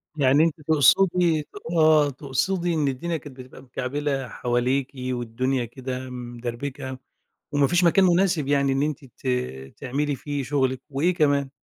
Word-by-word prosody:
يعني 140 0 +4
أنتِ 165 -1 0
تقصدي 170 +2 +4
ت 145 - -14 0.3
آه، 155 -2 +5
تقصدي 145 +7 -1
إن 155 -3 +1
الدنيا 160 +5 -2
كانت 140 -2 -12
بتبقى 130 0 -11
مكعبلة 135 +1 -3
حواليكِ 125 +3 -1 0.2
والدنيا 125 +1 -1
كده 130 +2 -6
مدربكة، 125 +2 -6 0.6
وما 145 -1 +3
فيش 175 +1 +2
مكان 180 +3 +5
مناسب 175 -4 +2
يعني 140 -1 +2
إن 135 +1 +1
أنتِ 150 -2 -3
ت 130 +1 -11 0.5
تعملي 140 +2 -2
فيه 145 +1 -4
شغلِك، 130 -1 0
وإيه 150 +6 +1
كمان؟ 140 -4 +2
140 Hz, 145 wpm, -24 LUFS, 130-155 Hz, 0.6 s, آه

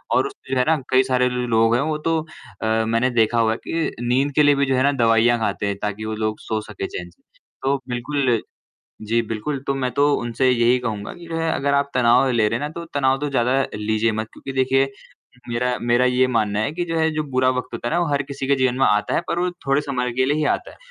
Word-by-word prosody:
और - - +3
उसमें 400 - -9
जो - - +1
है 125 - +3
ना 160 0 +4
कई 130 0 +4
सारे 125 -1 +1
लोग 115 -2 +2
हैं 125 - +2
वो 155 +1 -1
तो 165 -1 +2 0.4
मैंने 110 +2 +1
देखा 120 -1 +2
हुआ 110 -1 +3
है 110 - -1
कि 165 -1 -1
अ, - - -4
नींद 130 +4 +1
के 150 - +5
लिए 145 0 +5
भी 140 0 +2
जो 135 -1 +1
है 130 - +2
ना 140 - +4
दवाइयाँ 115 +1 +4
खाते 105 -2 -1
हैं 100 - -1
ताकि 105 +1 -3
वो 110 - -3
लोग 110 0 -2
सो 110 -1 -3
सके 105 -2 -6
चैन 90 0 -7
से। 85 - -27 0.4
तो 135 0 0
बिल्कुल 125 -1 0 0.7
जी 115 +2 +2
बिल्कुल, 115 +6 -3
तो 140 - 0
मैं 130 -2 -1
तो 145 +1 +3
उनसे 120 +2 0
यही 120 0 +3
कहूँगा 110 -4 -4
कि 175 -2 -12
जो 165 - -4
है 165 0 0
अगर 140 +1 0
आप 140 0 +1
तनाव 125 +1 +4
ले 115 -3 +2
रहे 115 +2 -1
है 145 - -4
ना - - -2
तो 170 +1 -7
तनाव 135 -1 +2
तो 145 - -1
ज़्यादा 130 0 +2 0.2
लीजिये 110 +1 0
मत। 110 +1 -3
क्योंकि 135 - -8
देखिये 135 +1 +2 0.6
मेरा 125 +1 0
मेरा 120 +1 +2
ये 125 0 +3
मानना 110 -4 0
है 110 - 0
कि 175 +2 -2
जो 165 -1 -2
है 160 0 +2
जो 155 - 0
बुरा 130 0 +2
वक़्त 125 - -3
होता 120 +1 -3
है - - -4
ना - - +2
वो 175 - +1
हर 140 0 +1
किसी 140 -1 -6
के 140 - +3
जीवन 130 -2 +1
में 135 - +4
आता 105 0 +1
है, - - +2
पर 170 - -1
वो 180 +1 0 0.2
थोड़े 135 +1 +3
समय 125 -4 -2
के 130 +2 +1
लिए 145 +3 +1
ही 155 - 0
आता - - -4
है। - - -16
125 Hz, 265 wpm, -21 LUFS, 115-140 Hz, 0.7 s, के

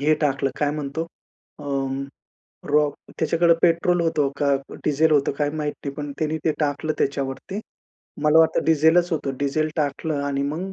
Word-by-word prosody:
हे 155 +2 +3
टाकलं 135 -2 +1
काय 145 -1 +1
म्हणतो, 150 +2 -3 0.5
अ, 150 - -10 1.1
रॉक 150 -1 +3 0.2
त्याच्याकडे 165 +1 +3
पेट्रोल 175 +1 +3
होतं 155 -4 +1
का 140 -1 +3 0.3
डीझेल 155 +2 +3
होतं 145 -2 +3
काय 145 -1 +1
माहित 150 -1 -2
नाही, 140 -1 -4
पण 145 0 -5
त्यांनी 155 0 0
ते 160 - +3
टाकलं 150 +1 0
त्याच्यावरती. 140 +8 -2 0.6
मला 150 +1 +5
वाटतं 160 0 +3
डीझेलच 160 +3 +4
होतं 135 -4 -2
डीझेल 150 +2 +1
टाकलं 145 0 -1
आणि 140 -1 -1
मग, 165 +7 -3
150 Hz, 155 wpm, -23 LUFS, 145-160 Hz, 1.1 s, मला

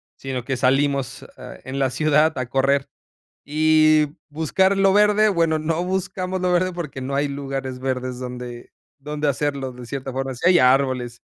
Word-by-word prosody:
sino 130 -2 -5
que 135 +1 -3
salimos, 135 +1 0
eh, - - -11
en 130 +1 -5
la 135 -2 +1
ciudad 155 +3 +2
a 130 - -2
correr 135 +2 +1 0.6
y 155 0 +4 0.2
buscar 165 +6 +1
lo 195 0 +4
verde, 210 +1 +4
bueno, 165 -4 +1
no 165 +2 -1
buscamos 185 0 -3
lo 180 0 +1
verde 185 +1 +1
porque, 155 -6 -6
no 135 +2 -3
hay 145 +1 +1
lugares 135 -2 -5
verdes 130 -1 -3
donde 125 -1 -7 0.3
donde 150 +1 -3
hacerlo 140 -1 -2
de 125 0 -11
cierta 135 +2 -5
forma, 135 0 -3
sí 125 - +1
hay 180 -1 +6
árboles 125 -3 +2
140 Hz, 170 wpm, -22 LUFS, 130-160 Hz, 0.6 s, hay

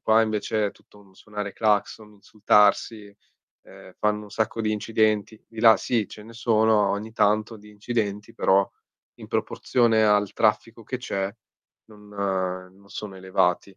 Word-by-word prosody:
qua 110 +1 +4
invece 110 0 -1
è - - -3
tutto 105 - -22
un 95 -2 -22
suonare 105 0 -7
clacson, 105 0 -1
insultarsi, 105 0 +1 0.5
ehm, - - -15
fanno 105 0 0
un 105 - -14
sacco 110 +1 -2
di 110 -1 0
incidenti. 110 0 0
Di 115 -1 -8
là 115 -1 +7
sì, 110 -5 -1
ce 105 - -11
ne 115 +2 -13
sono 110 -2 +2
ogni 105 +2 -4
tanto 110 +1 +1
di 105 0 -16
incidenti, 105 0 -3
però 100 -3 +3 0.5
in - - -12
proporzione 115 -3 +1
al 105 -1 +2
traffico 115 +1 0
che 130 - -4
c'è 95 -6 -3 0.6
non 105 -1 -17
non 95 -1 -4
sono 100 -1 -7
elevati. 95 0 -1
105 Hz, 155 wpm, -24 LUFS, 100-110 Hz, 0.6 s, là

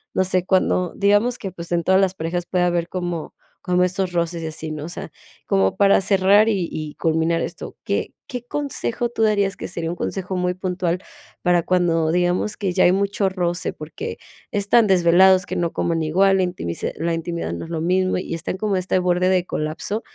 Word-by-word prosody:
no 190 - +3
sé 185 -1 +1
cuando, 185 -2 +1
digamos 205 +5 +2
que, 195 - -5
pues, 170 -1 -9
en 170 -1 +1
todas 190 +2 +4
las 190 -1 +1
parejas 170 +1 -3
puede 180 -1 +1
haber 175 -1 0
como 175 -3 -4 0.3
como 180 -1 +2
estos 180 0 -1
roces 170 -1 -1
y - - -3
así, 160 0 -5
¿no? 150 -1 -5
O - - -7
sea, 175 - -7 0.3
como 95 0 +2
para 200 0 +5
cerrar 195 +2 +4
y 190 -6 0
y 155 -1 -5
culminar 165 +1 +1
esto, - - -6
¿qué - - -2
qué 245 -2 -6
consejo 245 -4 -2
tú 230 -1 -1
darías? 200 -2 +2
que - - -5
sería 170 -2 -3
un 175 - -6
consejo 185 +1 -3
muy 180 0 0
puntual, 180 -1 -2 0.4
para 175 -1 +3
cuando 165 -3 +1
digamos 180 +4 +1
que 195 -3 -1
ya 185 - +4
hay 180 - +5
mucho 200 +1 0
roce, 175 -2 -1
porque 430 - -7 0.3
están 205 +2 +3
desvelados, 185 +1 +5
que - - -4
no 170 -1 -1
coman 165 -1 0
igual, 195 +5 +3
la 185 - +2
intimisa 175 - -3
la 165 +2 -1
intimidad 165 - -3
no 85 - -5
es 165 - -10
lo 160 -2 -2
mismo 185 +2 +1
y 180 - -4
está 165 +2 -4
como 200 -1 0
este 185 0 0
borde 180 0 +1
de 185 -1 +2
colapso. 165 +8 -3
180 Hz, 205 wpm, -21 LUFS, 170-195 Hz, 0.4 s, para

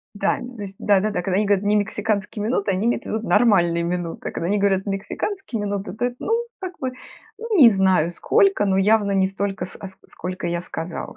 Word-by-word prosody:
Да, 205 0 0
то 245 -2 -9
есть 195 -1 -8
да-да-да, 205 -2 +1
когда 185 +1 -1
они 210 +1 +2
говорят 200 -1 +2
немексиканские 210 0 -1
минуты, 210 -3 0
они 190 +2 0
имеют 240 - 0
в - - -13
виду 220 +1 -3
нормальные 185 -7 +3
минуты. 170 -1 -3
Когда 165 - -4
они 205 +3 +1
говорят 195 -1 +2
мексиканские 215 - -4
минуты, 200 0 -3
то 230 +3 -3
это, 245 0 -2
ну, - - -2 0.3
как 370 -2 -7
бы, 260 -1 -2 0.5
ну, 455 -2 -2
не 255 -8 +9
знаю 190 -5 +2
сколько, 395 - +2
но 190 -1 +2
явно 205 +1 +3
не 190 -1 +3
столько, 195 -1 -3
ск 180 - -10
а 195 - -5
ск 190 - -14
а - - -21
сколько 180 +2 -5
я 170 0 -1
сказала. 170 -1 -6
200 Hz, 215 wpm, -22 LUFS, 190-220 Hz, 0.5 s, не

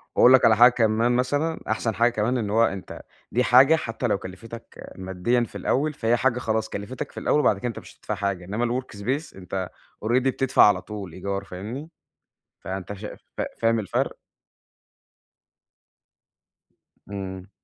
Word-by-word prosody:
وأقول 125 - +7
لك 130 - +6
على 110 -2 +5
حاجة 120 +1 +8
كمان 115 +1 +2
مثلًا، 145 +6 0
أحسن 110 -1 -1
حاجة 120 +3 +3
كمان 120 +3 0
إن 105 -4 -2
هو 115 +2 +4
أنت 95 -4 -3 0.3
دي 125 +2 +2
حاجة 135 +7 +6
حتّى 120 -4 -3
لو 100 - +1
كلِفتَك 95 +5 -10
ماديًا 95 +6 0
في - - -7
الأوّل، 150 +3 0
فهي 120 -2 +1
حاجة 125 -1 +1
خلاص 110 -2 -1
كلِفتَك 130 +8 -6
في - - -7
الأوّل 150 - +2
وبعد 105 -8 +3
كده 125 - -3
أنت 115 - -5
مش - - -15
هتدفع 105 - -3
حاجة، 100 -2 -2
إنّما 120 +6 -1
الwork 115 -5 -14
space 135 +8 -3
أنت 95 0 -5 0.4
already 120 +3 +3
بتدفع 135 0 +3
على 100 -3 +5
طول 100 -5 -8
إيجار 100 +1 -3
فاهمني؟ 110 - -7 0.7
فأنت 95 +1 -5
شا 105 +1 -8 0.2
فا - - 0
فاهم 115 0 +3
الفرق؟ 100 - -1 2.9
إمم. 95 -1 -6
115 Hz, 165 wpm, -24 LUFS, 100-125 Hz, 2.9 s, حاجة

